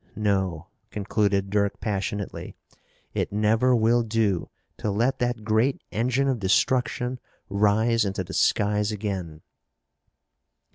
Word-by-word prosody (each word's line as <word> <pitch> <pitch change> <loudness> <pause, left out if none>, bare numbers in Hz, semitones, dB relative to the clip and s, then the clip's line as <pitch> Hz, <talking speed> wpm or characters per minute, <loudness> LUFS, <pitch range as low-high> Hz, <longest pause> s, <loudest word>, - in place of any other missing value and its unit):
No," 95 -6 0 0.2
concluded 100 -1 0
Dirk 100 -1 0
passionately, 100 -1 -4 0.6
"it - - -1
never 110 +5 +3
will 115 +1 +3
do 110 -5 0 0.3
to - - -2
let 115 +7 +1
that 120 -2 -1
great 110 +5 +1
engine 125 +5 +1
of 130 -3 0
destruction 125 +6 +1 0.3
rise 105 +3 +2
into 95 -2 -2
the 95 +2 -9
skies 105 0 +2
again!" 95 -7 -4
105 Hz, 110 wpm, -25 LUFS, 100-115 Hz, 0.6 s, never